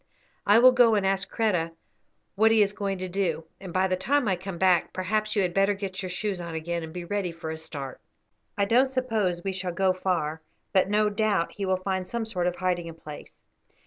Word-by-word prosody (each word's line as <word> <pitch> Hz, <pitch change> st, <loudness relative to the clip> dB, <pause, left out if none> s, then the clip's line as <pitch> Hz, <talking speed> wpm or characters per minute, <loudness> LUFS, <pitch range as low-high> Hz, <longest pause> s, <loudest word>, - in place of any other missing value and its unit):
I 205 Hz, +2 st, +7 dB
will 255 Hz, +2 st, +8 dB
go 245 Hz, -3 st, +5 dB
and 200 Hz, -2 st, +1 dB
ask 195 Hz, 0 st, 0 dB
Kreta 180 Hz, -7 st, 0 dB, 0.6 s
what 220 Hz, +3 st, +4 dB
he 225 Hz, -1 st, +5 dB
is 200 Hz, 0 st, -1 dB
going 200 Hz, -2 st, -2 dB
to 185 Hz, 0 st, -4 dB
do, 175 Hz, -4 st, -1 dB
and 190 Hz, -2 st, -8 dB
by 185 Hz, +2 st, +2 dB
the 185 Hz, -, +1 dB
time 260 Hz, +7 st, +1 dB
I 190 Hz, -, +2 dB
come 185 Hz, 0 st, -7 dB
back 180 Hz, -1 st, +3 dB
perhaps 215 Hz, +4 st, -1 dB
you 200 Hz, -, +3 dB
had 180 Hz, -1 st, -1 dB
better 195 Hz, +2 st, +3 dB
get 195 Hz, -1 st, -5 dB
your 185 Hz, -, -4 dB
shoes 190 Hz, 0 st, -3 dB
on 170 Hz, -1 st, -6 dB
again, 170 Hz, +1 st, -3 dB
and 160 Hz, -1 st, -7 dB
be 175 Hz, +1 st, -6 dB
ready 195 Hz, -1 st, -2 dB
for 165 Hz, -1 st, -6 dB
a -, -, -3 dB
start. 140 Hz, -4 st, -7 dB, 0.6 s
I 200 Hz, -, +3 dB
don't 255 Hz, +5 st, +3 dB
suppose 220 Hz, -9 st, 0 dB
we 195 Hz, -, -2 dB
shall 185 Hz, -1 st, -3 dB
go 190 Hz, +1 st, +2 dB
far, 165 Hz, -4 st, -1 dB, 0.3 s
but 190 Hz, 0 st, +3 dB
no 210 Hz, +1 st, +3 dB
doubt 205 Hz, -4 st, +1 dB
he 200 Hz, -5 st, -4 dB
will 185 Hz, 0 st, +2 dB
find 185 Hz, 0 st, -3 dB
some 235 Hz, -1 st, -2 dB
sort 180 Hz, -5 st, -1 dB
of 180 Hz, -, -1 dB
hiding 175 Hz, -2 st, -1 dB
place." 155 Hz, -2 st, -11 dB
190 Hz, 225 wpm, -27 LUFS, 175-205 Hz, 0.6 s, will